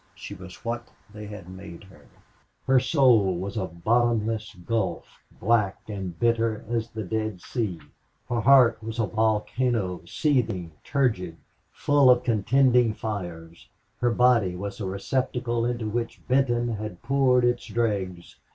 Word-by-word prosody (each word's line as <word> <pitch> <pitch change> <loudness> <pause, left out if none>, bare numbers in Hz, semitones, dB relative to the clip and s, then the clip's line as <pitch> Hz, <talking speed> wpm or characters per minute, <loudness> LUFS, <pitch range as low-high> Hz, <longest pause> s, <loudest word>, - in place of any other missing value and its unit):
She - - -8
was 90 +3 -12
what 120 0 -4 0.2
they 105 -1 -8
had 105 -4 -9
made 90 -1 -10
her. 95 -1 -18 0.6
Her 130 0 +5
soul 125 - +3
was 95 +3 -5
a 95 -4 -2
bottomless 110 +4 0
gulf, 110 -7 -2 0.2
black 105 -2 +1
and 95 -6 -6
bitter 115 -1 +1
as 115 0 -2
the 110 -1 -5
Dead 110 0 -3
Sea. 100 -4 -3 0.5
Her 120 -1 -1
heart 125 -3 +5
was 110 +1 -6
a 115 - +1
volcano, 110 -2 0
seething, 110 - 0
turgid, 110 - 0 0.3
full 145 -2 +3
of 125 0 +5
contending 125 +1 +3
fires. 85 -6 -6 0.3
Her 120 - +2
body 115 -6 +3
was 100 +3 -6
a 95 - -2
receptacle 120 +4 -1
into 120 -2 -2
which 115 +2 -4
Benton 120 -2 +2
had 105 -2 -7
poured 130 -1 +3
its 120 0 0
dregs. 95 -7 -2
110 Hz, 140 wpm, -25 LUFS, 95-120 Hz, 0.6 s, Her